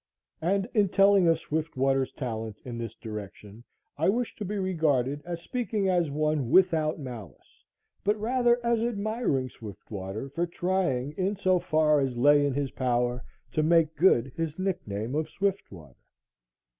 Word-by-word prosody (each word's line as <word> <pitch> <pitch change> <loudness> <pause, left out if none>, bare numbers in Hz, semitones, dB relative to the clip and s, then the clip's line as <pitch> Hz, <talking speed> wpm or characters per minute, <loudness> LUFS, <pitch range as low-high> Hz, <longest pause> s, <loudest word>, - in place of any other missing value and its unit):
And 195 +4 +1
in 205 -3 +3
telling 195 -1 +5
of 165 - +4
Swiftwater's 135 -4 -1
talent 110 -5 -5
in 120 -2 -6
this 115 -1 -5
direction, 105 0 -9 0.4
I 160 - +3
wish 240 +4 -1
to - - -4
be 205 +2 -3
regarded 145 -7 0
as 170 -1 -5
speaking 225 -5 -1
as 175 -4 +2
one 150 -3 0
without 160 -4 +3
malice, 120 - -10 0.4
but 210 +1 +1
rather 240 +2 +2
as 235 -1 +2
admiring 215 - -1
Swiftwater 105 +1 -7
for 170 +6 -2
trying, 170 -7 -1
in 195 +2 0
so 185 -2 +2
far 155 -3 +3
as 130 -3 -1
lay 145 +3 +5
in 140 -2 0
his 140 -2 -1
power, 125 -1 0 0.3
to 155 - +1
make 160 0 +3
good 135 -6 +3
his 160 -2 -3
nickname 130 - -3
of 155 +1 -1
Swiftwater. 130 - -4
155 Hz, 150 wpm, -27 LUFS, 125-190 Hz, 0.4 s, telling